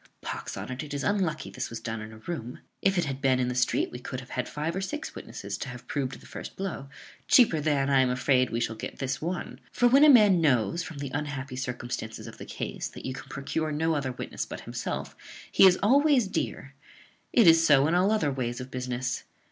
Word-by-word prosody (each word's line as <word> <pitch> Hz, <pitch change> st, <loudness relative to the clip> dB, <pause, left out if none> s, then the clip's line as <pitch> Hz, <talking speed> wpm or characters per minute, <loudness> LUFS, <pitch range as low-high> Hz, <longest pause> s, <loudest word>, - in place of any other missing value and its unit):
Pox -, -, -5 dB
on't, 130 Hz, 0 st, -5 dB
it 145 Hz, -2 st, -6 dB
is 140 Hz, -, -3 dB
unlucky 185 Hz, -6 st, 0 dB
this -, -, -4 dB
was 115 Hz, -, -6 dB
done 115 Hz, -1 st, -4 dB
in 110 Hz, 0 st, -8 dB
a 110 Hz, -, -11 dB
room: 125 Hz, -1 st, -6 dB, 0.2 s
if 195 Hz, -1 st, +2 dB
it 175 Hz, -, +2 dB
had 135 Hz, -1 st, -4 dB
been 130 Hz, -2 st, +3 dB
in 125 Hz, -1 st, +1 dB
the -, -, -1 dB
street 125 Hz, 0 st, +1 dB
we 120 Hz, -, -7 dB
could 130 Hz, +1 st, -5 dB
have 125 Hz, -, -12 dB
had 125 Hz, -, -3 dB
five 155 Hz, +3 st, -3 dB
or 190 Hz, -, -2 dB
six 300 Hz, +10 st, -4 dB
witnesses -, -, -7 dB
to 135 Hz, -, -4 dB
have 125 Hz, 0 st, -9 dB
proved 140 Hz, -2 st, -3 dB
the -, -, -17 dB
first -, -, -8 dB
blow, 180 Hz, -8 st, -5 dB, 0.4 s
cheaper 220 Hz, -, +5 dB
than, 145 Hz, -2 st, +1 dB
I 140 Hz, -1 st, +4 dB
am 130 Hz, -1 st, +4 dB
afraid, 130 Hz, 0 st, +2 dB
we 115 Hz, -, -2 dB
shall 115 Hz, -1 st, -1 dB
get -, -, -7 dB
this 135 Hz, -1 st, -3 dB
one; 175 Hz, +3 st, -4 dB
for 245 Hz, -, +3 dB
when 270 Hz, +4 st, +6 dB
a 305 Hz, -, +9 dB
man 210 Hz, -9 st, +7 dB
knows, 130 Hz, -, +2 dB
from 165 Hz, -3 st, -7 dB
the 140 Hz, -2 st, -5 dB
unhappy 140 Hz, -3 st, -4 dB
circumstances 125 Hz, -3 st, -5 dB
of -, -, -10 dB
the -, -, -7 dB
case, -, -, -4 dB
that -, -, -10 dB
you 130 Hz, -, -3 dB
can 130 Hz, -, -9 dB
procure 155 Hz, +3 st, -2 dB
no 160 Hz, +2 st, +1 dB
other 140 Hz, -4 st, -1 dB
witness -, -, -4 dB
but -, -, -7 dB
himself, -, -, -5 dB, 0.4 s
he 195 Hz, -, +8 dB
is 180 Hz, -1 st, +5 dB
always 275 Hz, +2 st, +5 dB
dear. 140 Hz, -6 st, -3 dB, 0.6 s
It 230 Hz, -, +5 dB
is 165 Hz, -1 st, +7 dB
so 145 Hz, -3 st, +5 dB
in 160 Hz, -, +1 dB
all 185 Hz, +4 st, +3 dB
other 210 Hz, -10 st, +2 dB
ways 120 Hz, -3 st, -3 dB
of 130 Hz, +1 st, -8 dB
business. 125 Hz, 0 st, -3 dB
140 Hz, 235 wpm, -28 LUFS, 125-175 Hz, 0.6 s, a